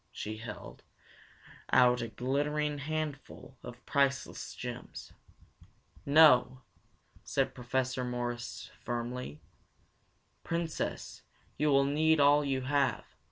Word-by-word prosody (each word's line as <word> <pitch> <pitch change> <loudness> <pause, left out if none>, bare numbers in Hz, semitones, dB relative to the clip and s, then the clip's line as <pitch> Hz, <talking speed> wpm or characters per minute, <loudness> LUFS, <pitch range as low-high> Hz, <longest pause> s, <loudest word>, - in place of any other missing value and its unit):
She 110 +1 -5
held 110 -1 -9 0.9
out 125 -1 +5
a 115 - -3
glittering 145 +5 -1
handful 145 -3 -5
of 125 +1 -11
priceless 140 -2 0
gems. - - -8 0.9
"No," 130 -4 +6 0.6
said - - 0
Professor 130 +1 -2
Morris 120 -1 -4
firmly. 120 -8 -4 1.0
"Princess, 165 -1 -3 0.3
you 150 +2 +1
will 140 -1 +4
need 155 +2 +3
all 145 +1 +5
you 135 -2 -1
have. 140 +1 0
135 Hz, 95 wpm, -31 LUFS, 125-145 Hz, 1.0 s, No